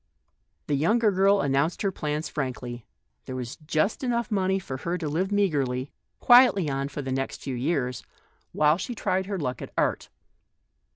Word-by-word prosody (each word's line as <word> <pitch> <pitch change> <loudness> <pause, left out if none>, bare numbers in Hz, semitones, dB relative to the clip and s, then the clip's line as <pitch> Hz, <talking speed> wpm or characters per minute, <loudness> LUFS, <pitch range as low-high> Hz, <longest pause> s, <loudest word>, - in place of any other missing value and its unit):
The 150 - -2
younger 210 +10 +3
girl 195 +1 +4
announced 140 +7 0
her 195 - +1
plans 150 -2 -3
frankly. 125 -5 -5 0.4
There 130 - -6
was 125 -1 -5
just 155 - -1
enough 235 -3 -1
money 190 -2 +1
for 135 -8 -5
her 170 +7 -2
to 165 -3 -4
live 170 +6 -1
meagrely, 140 -10 0 0.3
quietly 245 -8 +6 0.2
for 145 +1 -6
the 135 - -4
next 135 +1 -3
few 135 - -3
years, 125 -1 -1 0.5
while 150 +3 +3
she 240 +6 -4
tried 190 -2 -1
her 200 -1 -2
luck 130 -7 -3
at - - -7
art. - - 0
155 Hz, 165 wpm, -26 LUFS, 135-195 Hz, 0.5 s, quietly